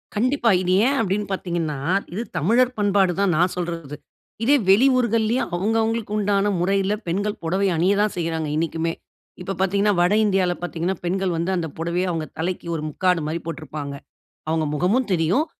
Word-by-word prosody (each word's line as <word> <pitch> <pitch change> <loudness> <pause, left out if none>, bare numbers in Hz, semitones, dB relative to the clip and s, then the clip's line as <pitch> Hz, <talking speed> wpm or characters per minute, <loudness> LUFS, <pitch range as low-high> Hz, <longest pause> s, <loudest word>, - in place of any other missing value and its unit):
கண்டிப்பா. 245 +2 +2
இது 180 0 0
ஏன் 275 +2 +2
அப்டின்னு 205 0 -1
பார்த்தீங்கன்னா, 170 -5 -2 0.4
இது 205 - -2 0.2
தமிழர் 245 - +2
பண்பாடு 200 -3 +3
தான் 200 -3 +2
நான் 175 +2 +2
சொல்றது. 165 -5 -4 0.5
இதே 275 +5 +5
வெளியூர்கள்லையும் 235 +1 +3
அவுங்கவுங்களுக்கு 220 +3 0
உண்டான 205 0 +1
முறையில 195 +2 +1
பெண்கள் 205 +5 -2
புடவை 190 +4 +1
அணிய 180 +5 +2
தான் 210 0 +1
செய்றாங்க, 165 -2 -2
இன்னைக்குமே. 165 +1 -1 0.5
இப்ப 190 +2 -4
பார்த்தீங்கன்னா, 200 +2 +2
வட 175 +3 +3
இந்தியால 190 -3 +2
பார்த்தீங்கன்னா, 175 +1 -2
பெண்கள் 190 +1 0
வந்து, 170 +3 -1
அந்த 165 -2 -2
புடவைய 170 +3 -1
அவங்க 165 -2 -2
தலைக்கு 175 +1 -3
ஒரு 155 - -3
முக்காடு 180 +2 +1
மாரி 160 +2 -2
போட்ருப்பாங்க. 155 -3 -6 0.6
அவுங்க 160 0 +1
முகமும் 205 - +1
தெரியும். 180 - +1
185 Hz, 155 wpm, -22 LUFS, 165-210 Hz, 0.6 s, இதே